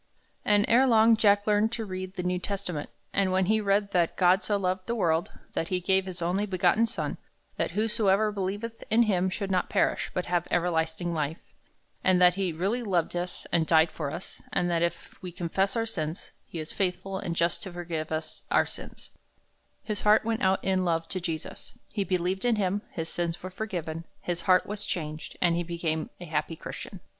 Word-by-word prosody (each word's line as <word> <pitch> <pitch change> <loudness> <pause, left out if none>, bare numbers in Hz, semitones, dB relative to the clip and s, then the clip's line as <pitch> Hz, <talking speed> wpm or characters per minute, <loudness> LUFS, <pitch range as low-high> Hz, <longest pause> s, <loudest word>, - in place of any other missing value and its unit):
And, 205 0 +4
erelong, 230 -2 +6
Jack 205 -1 +4
learned 210 +1 +3
to 225 -2 -3
read 185 -1 -5
the 180 - -3
New 180 0 0
Testament, 180 -6 -4 0.2
and 195 -2 +2
when 185 0 +3
he 215 +3 +2
read 200 0 +1
that 175 -3 +1
"God 185 +2 +4
so 205 - +1
loved 185 -1 -1
the 235 - 0
world, 170 -5 +1 0.2
that 165 - -1
he 185 0 0
gave 190 +1 +2
his 175 -2 -4
only 190 +5 0
begotten 190 +4 +3
Son, 225 - -3 0.4
that - - 0
whosoever 215 -1 +2
believeth 205 +3 -4
in 230 +2 +5
him 190 -4 +2
should 195 +1 -3
not 185 -1 +1
perish, - - +1
but 180 - -1
have 175 -1 0
everlasting 170 0 0
life," 155 0 -1 0.7
and 185 -1 +4
that 180 0 +7
he 190 -1 -1
really 195 +9 -1
loved 180 -7 0
us 175 +1 -4
and 165 -2 +2
died 160 0 +5
for 150 -3 -3
us, 170 - -8
and 175 0 +1
that 170 -1 +1
"if 170 0 -3
we 180 - -6
confess 185 +3 -1
our 225 -1 +1
sins, 165 -7 -4 0.2
he - - -8
is 155 0 -5
faithful 190 0 -2
and 170 - -3
just 170 +1 +1
to 190 - -5
forgive 165 -3 -4
us 155 0 -4
our - - +4
sins," - - -9 0.7
his 215 -2 -2
heart 210 +1 +5
went 225 0 -1
out 190 0 +2
in 190 -1 +2
love 165 -2 0
to 185 - -2
Jesus. 165 -3 -5
He 200 - -1
believed 185 0 -1
in 240 -2 +3
him, 200 0 0
his 160 -1 -4
sins 170 -1 -2
were 185 - -5
forgiven, 170 -5 -4
his 175 -1 -3
heart 185 0 +6
was 205 0 -4
changed, 155 -2 -4
and 170 -1 +4
he 175 - 0
became 165 -2 -2
a 175 - -7
happy 155 +1 -2
Christian. - - -8
185 Hz, 200 wpm, -28 LUFS, 170-205 Hz, 0.7 s, that